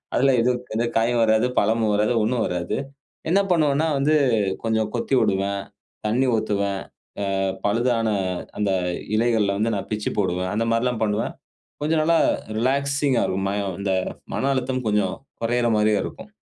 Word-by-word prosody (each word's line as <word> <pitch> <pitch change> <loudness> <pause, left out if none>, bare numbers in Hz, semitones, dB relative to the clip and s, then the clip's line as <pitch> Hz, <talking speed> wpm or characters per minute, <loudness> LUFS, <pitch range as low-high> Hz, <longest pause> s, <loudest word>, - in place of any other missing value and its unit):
அதில 135 +1 +4
எதும் 125 +1 +2
இருக்காது 120 -1 -3
காயும் 115 +1 +2
வராது. 110 +1 +3
பழமும் 110 0 +2
வராது. 105 +3 +2
ஒண்ணும் 115 +1 +1
வராது. 90 -1 -2 0.5
என்ன 195 - +5
பண்ணுவேன்னா, 155 -2 +2
வந்து 150 +3 +3 0.5
கொஞ்சம் 110 -1 0
கொத்தி 120 - -2
வுடுவேன், 100 -2 0 0.5
தண்ணி 125 +5 +2
ஊத்துவேன். 100 -2 -1 0.6
அ - - 0 0.3
பழுதான 115 +2 +1 0.5
அந்த 100 -2 +1 0.5
இலைகள 115 -3 +2
வந்து 110 +1 0
நான் 100 - -5
பிச்சு 105 -1 -2
போடுவேன். 90 -1 0
அந்தமாரிலாம் 115 +2 0
பண்ணுவேன். 105 0 -1 0.5
கொஞ்சம் 155 +1 +2
நல்லா 165 +1 +3 0.4
ரிலாக்ஸிங்கா 140 0 +1
இருக்கும். 95 +1 -1
ம 100 -3 -2
இந்த 95 -1 0 0.4
மன 135 - 0
அழுத்தம் 130 -1 -2
கொஞ்சம் 105 -3 +1 0.3
குறையிற 120 +1 +1
மாரியா 105 0 +3
இருக்கும். - - -9
115 Hz, 140 wpm, -23 LUFS, 105-125 Hz, 0.6 s, என்ன